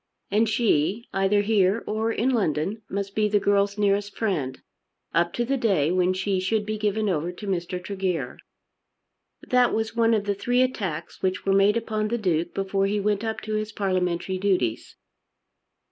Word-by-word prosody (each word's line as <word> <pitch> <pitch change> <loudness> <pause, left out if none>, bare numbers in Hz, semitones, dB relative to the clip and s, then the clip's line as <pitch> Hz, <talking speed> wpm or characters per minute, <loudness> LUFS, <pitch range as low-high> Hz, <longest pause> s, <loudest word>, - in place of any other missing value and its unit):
And 215 +2 +3
she, 215 -1 +1
either 195 +1 +2
here 205 0 +2
or 220 +1 -1
in 240 +4 +1
London, 195 - 0
must 200 0 -3
be 210 0 +1
the 205 0 +3
girl's 200 0 +1
nearest 205 0 0
friend 155 - -1 0.5
up 170 +1 +2
to 240 - -1
the 275 +3 0
day 190 - +2
when 180 0 +2
she 190 +1 -1
should 205 +3 0
be 215 0 -3
given 215 0 0
over 175 -2 -1
to 195 +4 -10
Mr. 180 -1 -2
Tregear. 185 -8 -3 1.0
That 250 -1 +3
was 220 +1 -2
one 230 -1 +3
of 210 - 0
the 205 0 0
three 245 +5 +2
attacks 190 -11 -4
which 185 0 -1
were 195 - +3
made 200 +3 +4
upon 215 -2 -2
the 235 +2 -1
Duke 175 -5 0
before 195 0 0
he 205 +1 0
went 205 +1 0
up 220 -1 -3
to 215 - -5
his 215 0 -2
parliamentary 185 -2 -1
duties. 185 - 0
200 Hz, 175 wpm, -25 LUFS, 185-215 Hz, 1.0 s, made